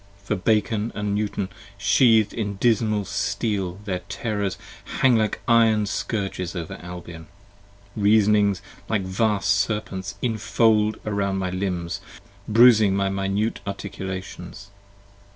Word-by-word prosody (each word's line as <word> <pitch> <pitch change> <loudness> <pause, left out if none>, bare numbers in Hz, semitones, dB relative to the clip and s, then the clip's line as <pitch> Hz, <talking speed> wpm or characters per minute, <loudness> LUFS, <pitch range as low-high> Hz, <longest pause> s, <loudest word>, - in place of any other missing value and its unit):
For 105 +2 -1
Bacon 105 +2 0
& - - -22 0.2
Newton 105 -2 -2 0.3
sheath'd 110 +2 +4
in 105 -3 -3
dismal 110 -1 +1
steel 95 -3 -2
their 95 -3 -2
terrors 100 -4 -2 0.4
hang 130 -2 +4
Like 110 -2 0
iron 115 -2 +4
scourges 95 -4 -3
over 85 -3 -5
Albion. 90 -2 -9 0.7
Reasonings 105 -1 +3 0.3
like 105 -3 0
vast 100 +1 +1
Serpents 100 -2 -1
Infold 110 -1 +2
around 100 -2 -1
my 95 -1 -2
limbs, 90 -2 -3 0.5
bruising 110 -3 +6
my 100 0 +1
minute 95 +3 -1
articulations. 95 0 -7
100 Hz, 110 wpm, -23 LUFS, 95-110 Hz, 0.7 s, bruising